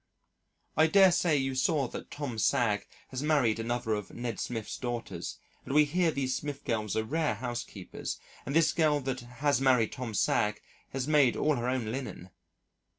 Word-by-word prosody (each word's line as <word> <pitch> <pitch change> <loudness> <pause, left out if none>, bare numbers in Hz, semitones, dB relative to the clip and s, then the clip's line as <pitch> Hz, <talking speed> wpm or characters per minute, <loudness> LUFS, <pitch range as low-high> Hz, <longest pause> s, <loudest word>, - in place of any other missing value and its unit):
I 155 +1 +5
dare 190 +2 +6
say 170 -3 +3
you 135 -1 0
saw 135 +1 +1
that - - -7
Tom 135 -6 -4
Sagg 105 -2 +2 0.2
has 130 0 -4
married 140 -8 +2
another 120 0 -1
of 105 -2 -4
Ned 120 -2 -4
Smith's 115 -3 -4
daughters 120 -2 -4 0.3
and 135 - -4
we 150 0 +7
hear 170 +3 +2
these 135 -4 -1
Smith 145 +1 -5
girls 110 -3 -1
are 110 - +2
rare 150 +2 0
housekeepers 120 -4 -5 0.2
and 140 - -4
this 165 -1 +4
girl 155 -3 +3
that 130 -1 -2
has 130 +3 0
married 125 -5 +4
Tom 120 -4 -5
Sagg 105 +1 +2 0.3
has 135 0 -3
made 145 -5 +4
all 155 -1 +2
her 120 0 -1
own 125 -4 -1
linen. 120 -8 -6
130 Hz, 175 wpm, -30 LUFS, 115-145 Hz, 0.3 s, we